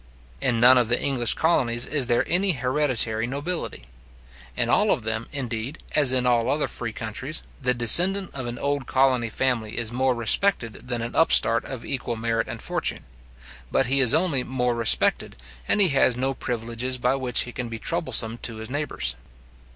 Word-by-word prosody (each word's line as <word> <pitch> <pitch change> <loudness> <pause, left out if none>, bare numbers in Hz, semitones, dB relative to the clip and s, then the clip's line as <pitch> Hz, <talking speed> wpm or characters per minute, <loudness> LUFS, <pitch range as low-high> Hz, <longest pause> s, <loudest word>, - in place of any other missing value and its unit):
In 120 -3 +1
none 125 +2 +7
of 120 - 0
the 120 - +2
English 125 -5 0
colonies 120 -8 +1
is 145 -5 -1
there 120 -1 0
any 185 +2 +2
hereditary 125 -4 0
nobility. 145 - -4 0.7
In - - 0
all - - +2
of - - +1
them, 110 +1 -4
indeed, 125 +1 -5 0.2
as 145 -4 +5
in 130 -1 +1
all 120 -1 +1
other 145 +2 0
free 120 -2 -6
countries, 115 +8 -5 0.2
the 125 -1 +1
descendant 180 - +4
of 130 -3 -5
an 120 0 -6
old 140 -1 -3
colony 130 -3 +1
family 115 -2 -2
is 115 -1 -1
more 130 +1 0
respected 120 - 0
than 120 -2 -3
an 120 - -6
upstart 115 -7 +3
of 130 -3 -8
equal 125 -3 -4
merit 115 0 -2
and - - -8
fortune; - - -3 0.7
but 135 - +2
he 135 +3 +2
is 125 -4 +5
only 160 -7 +1
more 125 -1 -2
respected, 115 - +1 0.3
and - - +1
he 195 -3 +6
has 135 -3 +2
no 135 +2 -1
privileges 120 +1 -4
by 125 +1 0
which 130 -3 0
he 120 - -5
can 120 -1 -6
be 115 - -6
troublesome 120 -5 +1
to 115 - -2
his 110 +2 -7
neighbours. 145 +2 -2
125 Hz, 180 wpm, -23 LUFS, 115-135 Hz, 0.7 s, none